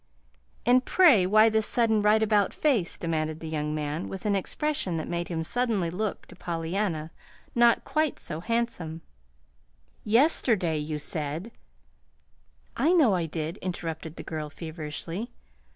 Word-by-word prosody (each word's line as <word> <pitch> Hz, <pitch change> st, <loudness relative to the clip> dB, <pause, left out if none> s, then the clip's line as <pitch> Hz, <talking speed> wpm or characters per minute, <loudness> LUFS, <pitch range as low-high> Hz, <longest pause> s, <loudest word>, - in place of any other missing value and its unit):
"And, 250 Hz, +1 st, +5 dB
pray, 265 Hz, -, +5 dB
why 215 Hz, +3 st, +6 dB
this 220 Hz, 0 st, +1 dB
sudden 225 Hz, -3 st, +2 dB
right 210 Hz, +1 st, +4 dB
about 210 Hz, -2 st, +2 dB
face?" 240 Hz, -, +1 dB
demanded 155 Hz, -2 st, -2 dB
the 160 Hz, -, -7 dB
young 150 Hz, -1 st, -2 dB
man 150 Hz, +2 st, -3 dB
with 195 Hz, +2 st, -7 dB
an 205 Hz, -1 st, +2 dB
expression 195 Hz, -, -2 dB
that 160 Hz, -, -4 dB
made 175 Hz, 0 st, -2 dB
him 165 Hz, -2 st, -3 dB
suddenly 215 Hz, -4 st, 0 dB
look, 205 Hz, +3 st, -3 dB
to -, -, -14 dB
Pollyanna, 165 Hz, -1 st, -3 dB, 0.4 s
not 235 Hz, -1 st, +4 dB
quite 310 Hz, -2 st, 0 dB
so 155 Hz, -, -6 dB
handsome. 180 Hz, -7 st, -2 dB, 1.0 s
"Yesterday 215 Hz, -, +3 dB
you 150 Hz, 0 st, -3 dB
said 155 Hz, +6 st, -3 dB, 0.6 s
" 60 Hz, -1 st, -39 dB
"I 335 Hz, -, +5 dB
know 290 Hz, -, +5 dB
I 175 Hz, -3 st, 0 dB
did," 160 Hz, +3 st, -4 dB
interrupted 165 Hz, -4 st, -5 dB
the -, -, -8 dB
girl, 155 Hz, -2 st, -5 dB
feverishly. 165 Hz, +6 st, -6 dB
180 Hz, 145 wpm, -27 LUFS, 160-220 Hz, 1.0 s, why